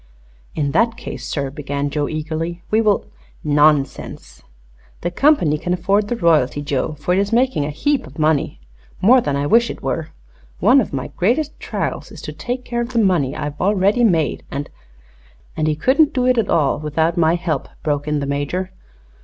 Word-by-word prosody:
"In 145 -2 -1
that 230 +8 +2
case, 125 -1 -7
sir," 140 -2 -3
began 145 0 -3
Joe, 145 -1 -1
eagerly, 160 +2 -4
"we 220 +1 +4
will 210 -3 +2 0.3
" - - -30 0.2
"Nonsense. 140 - +1 0.6
The 175 - -2
company 175 - +3
can 175 +2 -1
afford 195 +4 +1
the 240 - -1
royalty, 155 - +2
Joe, 140 +2 -1
for 150 +4 -2
it 185 - +2
is 200 +2 0
making 245 - +2
a - - -3
heap 250 - -1
of 135 - -15
money 155 - +1 0.4
more 245 +6 +6
than 145 -10 -1
I 140 +1 -1
wish 235 +9 +4
it - - -7
were. - - -2 0.5
One 270 +2 +5
of - - -5
my 130 -1 -4
greatest 260 - -1
trials - - -4
is - - -10
to - - -6
take 250 +1 -4
care 240 -1 -2
of 240 +2 -5
the - - -1
money 180 - +2
I've 150 -1 -5
already 200 +4 +2
made, 165 -9 +1
and 140 +1 -5 0.4
" - - -30
"And 155 -1 0
he 155 - +1
couldn't 280 - +3
do 250 -1 +1
it 250 -1 +3
at 225 - -1
all 145 -3 +2
without 160 +2 0
my 165 -1 +3
help," 175 -2 -3
broke 145 -1 -1
in 150 -1 0
the - - -2
Major. 145 +7 -2
165 Hz, 195 wpm, -19 LUFS, 145-220 Hz, 0.6 s, more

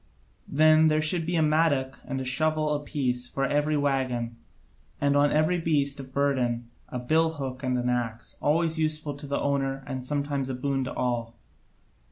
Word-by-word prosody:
Then 155 +2 +5
there 155 0 +3
should 160 +1 +1
be 175 - 0
a 160 - +3
mattock 150 -4 +1
and 135 0 -3
a 130 - -4
shovel 155 +3 +1
apiece 135 -4 -2
for 135 +2 -1
every 150 +2 +1
waggon, 130 -5 -1 0.6
and 140 0 +2
on 145 0 +4
every 155 +4 +2
beast 145 -4 +1
of 130 -1 -9
burden 125 -4 0 0.2
a 125 - -4
billhook 140 -1 0
and 130 -2 0
an 125 0 -1
axe, 120 -1 -3
always 160 +2 +1
useful 155 -1 -1
to 140 +1 -9
the 140 - -1
owner 135 -1 -1
and 130 -2 -5
sometimes 140 0 -2
a 130 - -2
boon 135 +1 -1
to - - -5
all. 120 -2 -2
140 Hz, 175 wpm, -27 LUFS, 130-155 Hz, 0.6 s, Then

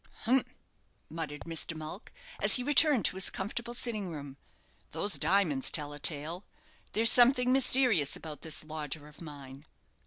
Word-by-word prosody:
"Humph!" 250 +2 +1 0.6
muttered 155 -3 -6
Mr. 165 0 -4
Mulck, 155 +6 -9 0.3
as - - +6
he 250 - -1
returned 290 -2 +4
to - - +1
his 190 - 0
comfortable 235 +5 -5
sitting 215 -6 -2
room; 145 -4 -8 0.6
"those 205 - 0
diamonds 160 -5 +2
tell 145 -2 +2
a 145 - -9
tale. 160 +5 0 0.5
There's 225 +2 +4
something 250 0 +4
mysterious 250 - +3
about 155 -2 -9
this 155 -2 -3
lodger 155 -1 -6
of 150 +1 -15
mine. 140 -3 -10
165 Hz, 150 wpm, -30 LUFS, 150-235 Hz, 0.6 s, as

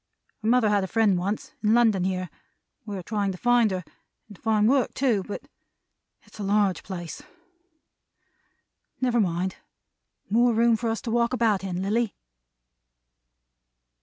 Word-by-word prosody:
Her 215 - -3
mother 240 -2 +4
had 205 -2 +2
a - - -2
friend 220 -2 +3
once, 195 +4 -3
in 215 +1 +3
London 220 -6 +3
here. 185 -1 -2 0.6
We 205 -1 -4
are 185 - -6
trying 205 0 -1
to - - -8
find 245 +1 +3
her, 185 -2 -3 0.4
and 210 - -13
to - - -22
find 215 -1 +2
work 260 0 +2
too; 245 -7 +2
but 205 - -7 0.8
it's - - -17
a - - -3
large 200 -2 +1
place. 175 -4 -7 1.8
Never 245 -2 +1
mind. 180 0 -1 0.7
More 235 +2 +3
room 230 0 +4
for 230 +1 -2
us 225 - -2
to 230 - -3
walk 235 +1 +1
about 220 -6 +1
in, 185 -1 -3
Lilly!" 220 +2 0
210 Hz, 155 wpm, -25 LUFS, 190-235 Hz, 1.8 s, mother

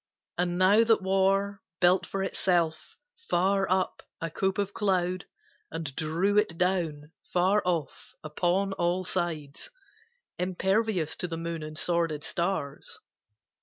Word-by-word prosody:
And 175 0 0
now 200 +5 +6
that 225 -4 +3
war 195 +1 +2 0.2
Built 180 +1 +4
for 195 0 -2
itself, 175 -4 0 0.3
far 195 +2 +2
up, 185 0 0 0.2
a 165 -1 -4
cope 190 +3 0
of 200 0 -1
cloud, 185 -3 0 0.4
And 155 -5 -5
drew 170 +6 +2
it 170 -6 -1
down, 165 -5 -1 0.2
far 190 +4 +3
off, 170 -5 -3
upon 180 +5 0
all 175 +1 0
sides, 165 - -3 0.7
Impervious 190 -1 0
to 180 - -1
the 165 -1 -4
moon 165 0 -4
and 155 0 -7
sworded 165 -4 0
stars. 170 -6 -3
180 Hz, 130 wpm, -28 LUFS, 165-195 Hz, 0.7 s, now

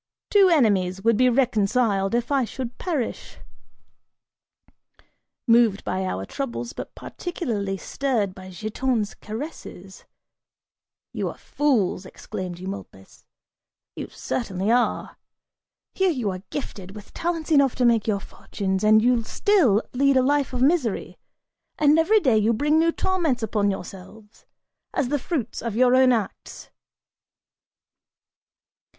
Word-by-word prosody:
Two 395 -2 +6
enemies 195 - +2
would 230 0 +4
be 255 +3 +4
reconciled 225 -4 +1
if 240 +3 -1
I 275 -2 +3
should 245 +1 -6
perish!" 310 -10 -3 2.1
(Moved 230 -4 +4
by 185 0 -2
our 95 - -3
troubles, 245 - -5
but - - -8
particularly 215 - -4
stirred 225 -3 -1
by 185 0 -11
Giton's 215 +3 -2
caresses, 215 - -9 1.1
"You - - -2
are - - -9
fools," 215 -10 0
exclaimed 185 -5 -7
Eumolpus, 185 - -9 0.7
"you - - -5
certainly 195 -3 -2
are: 245 +1 0 0.8
here 380 0 +2
you 245 - -1
are 185 -1 -6
gifted 195 -8 -6
with 210 -1 -12
talents 330 -1 -3
enough 280 -4 +4
to 250 - +1
make 230 -3 +3
your 205 -2 +1
fortunes 190 0 -4
and 215 +1 +5
you 245 -1 +3
still 260 - +2
lead 275 +1 +3
a 260 - +4
life 285 +1 +1
of 250 -1 -1
misery, 275 - 0 0.6
and 300 +1 +4
every 430 +7 +4
day 255 - +3
you 220 +2 +2
bring 295 +7 +2
new 335 +1 +3
torments 330 -11 0
upon 205 -1 +1
yourselves, 195 +3 -9 0.5
as 265 -3 0
the 290 0 0
fruits 260 -5 -3
of 230 -3 -4
your 250 +1 +4
own 260 0 +5
acts!)" 220 -5 -4
235 Hz, 130 wpm, -24 LUFS, 200-275 Hz, 2.1 s, Two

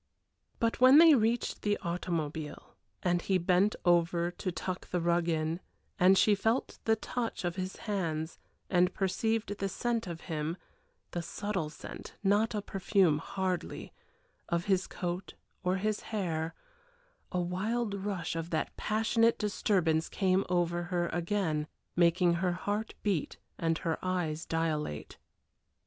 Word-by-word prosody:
But 230 0 0
when 260 +3 +9
they 325 0 +9
reached 230 -2 +1
the 205 -1 +1
automobile 160 -3 -3 0.3
and 175 -1 +2
he 190 +1 +2
bent 185 +4 +3
over 170 0 +3
to 185 +1 -4
tuck 180 +2 -4
the 180 - 0
rug 170 0 +2
in 160 +1 0 0.4
and 190 +1 +6
she 210 - +5
felt 225 +5 0
the 225 - +4
touch 230 -2 -3
of 175 -1 -1
his 185 0 -3
hands 165 -6 -3 0.3
and 180 0 +3
perceived 210 +2 0
the 195 - -1
scent 230 0 -1
of 170 -2 -6
him 160 +1 -3 0.5
the 175 - -2
subtle 185 -1 -3
scent, 150 - -9
not 210 +3 +3
a 205 - -2
perfume 195 -6 +2
hardly, 185 +1 -3 0.6
of 170 0 0
his 190 -2 +2
coat, 180 +1 -4 0.3
or 180 0 +2
his 210 +2 0
hair, 165 -6 -2 0.8
a 180 - 0
wild 205 +6 -1
rush 195 -4 -3
of 165 0 -3
that 160 - -2
passionate 225 +2 +2
disturbance 180 -6 +1
came 190 -1 +2
over 175 -1 +1
her 175 -1 -1
again, 165 -3 -1 0.3
making 175 0 +4
her 180 -2 +2
heart 205 +4 -3
beat 195 -8 0 0.2
and 165 -1 +1
her 165 0 -2
eyes 170 -4 -1
dilate. 155 - -2
180 Hz, 140 wpm, -31 LUFS, 170-205 Hz, 0.8 s, when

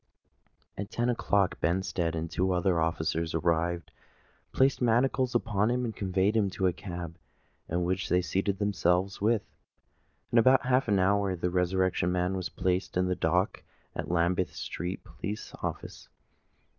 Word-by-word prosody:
At 100 +1 -4
ten 120 +2 0
o'clock 100 -5 +1
Benstead 85 -1 0
and 80 0 -2
two 95 +1 +1
other 90 -1 +2
officers 80 0 -1
arrived, 85 +1 0 0.6
placed 135 0 +2
manacles 125 +1 +2
upon 110 -2 +1
him, 125 +1 0
and 110 - -4
conveyed 95 +2 +1
him 105 -3 +2
to 95 0 -2
a 90 - +3
cab, 85 -3 -7 0.5
in 85 +2 0
which 95 +2 -1
they 90 - +4
seated 95 +2 -1
themselves 95 -1 +1
with 110 0 +2
him. - - -35 0.8
In 120 - +2
about 130 +3 +5
half 130 +1 +2
an 100 -2 +3
hour 95 0 +2
the 90 0 -2
Resurrection 90 0 +1
Man 90 +1 0
was 90 -2 -3
placed 90 0 -1
in 90 - +2
the 90 - +1
dock - - 0 0.3
at - - -3
the - - -2
Lambeth 90 +2 +1
Street 90 +3 -5
Police 105 +2 -6
Office. - - -6
95 Hz, 160 wpm, -29 LUFS, 90-105 Hz, 0.8 s, about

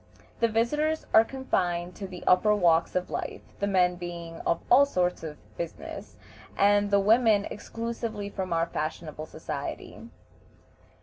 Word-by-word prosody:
The 230 - +4
visitors 295 +8 0
are 220 - +8
confined 180 -9 -2
to 195 - -5
the 180 -1 -9
upper 210 +4 +4
walks 170 -4 +3
of 180 0 -1
life, - - -4 0.2
the 200 - 0
men 180 -2 +2
being 170 -1 -7
of 170 - +2
all 265 +3 +8
sorts 180 -10 0
of 155 -2 -7 0.2
business, 315 - -7 0.4
and 205 0 +4
the 200 0 +4
women 215 0 +4
exclusively 230 -1 -5
from 190 -2 -5
our 165 0 +2
fashionable 155 -1 -5
society. - - -6
200 Hz, 140 wpm, -27 LUFS, 175-225 Hz, 0.4 s, are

